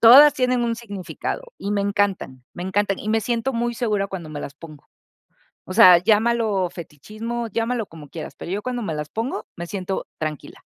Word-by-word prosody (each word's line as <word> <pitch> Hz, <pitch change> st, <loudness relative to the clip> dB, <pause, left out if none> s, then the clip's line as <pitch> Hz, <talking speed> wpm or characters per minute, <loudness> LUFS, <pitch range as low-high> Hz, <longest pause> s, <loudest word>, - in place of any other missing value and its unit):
Todas 270 Hz, +6 st, +10 dB
tienen 250 Hz, -2 st, +1 dB
un 230 Hz, -1 st, 0 dB
significado, 235 Hz, -, -5 dB
y 200 Hz, -, -4 dB
me 205 Hz, -1 st, +1 dB
encantan, 200 Hz, -10 st, -1 dB
me 175 Hz, -, -6 dB
encantan, 195 Hz, +1 st, 0 dB
y 215 Hz, -, -6 dB
me 220 Hz, 0 st, +2 dB
siento 235 Hz, +3 st, -1 dB
muy 240 Hz, 0 st, -1 dB
segura 210 Hz, -5 st, 0 dB
cuando 180 Hz, -5 st, -6 dB
me 150 Hz, -1 st, -6 dB
las 140 Hz, -, -7 dB
pongo. 155 Hz, -1 st, -13 dB, 0.8 s
O 185 Hz, -, -6 dB
sea, 185 Hz, -5 st, +9 dB
llámalo 215 Hz, -2 st, +2 dB
fetichismo, 215 Hz, +9 st, -6 dB
llámalo 230 Hz, 0 st, -1 dB
como 155 Hz, -4 st, -13 dB
quieras, 160 Hz, -, -7 dB
pero 175 Hz, -, -7 dB
yo, 205 Hz, +2 st, -1 dB
cuando 245 Hz, -1 st, -2 dB
me 165 Hz, -7 st, -3 dB
las 150 Hz, 0 st, -4 dB
pongo, 225 Hz, -, -3 dB
me 170 Hz, 0 st, -6 dB
siento 190 Hz, -1 st, -3 dB
tranquila. 155 Hz, -3 st, -5 dB
205 Hz, 190 wpm, -23 LUFS, 175-235 Hz, 0.8 s, Todas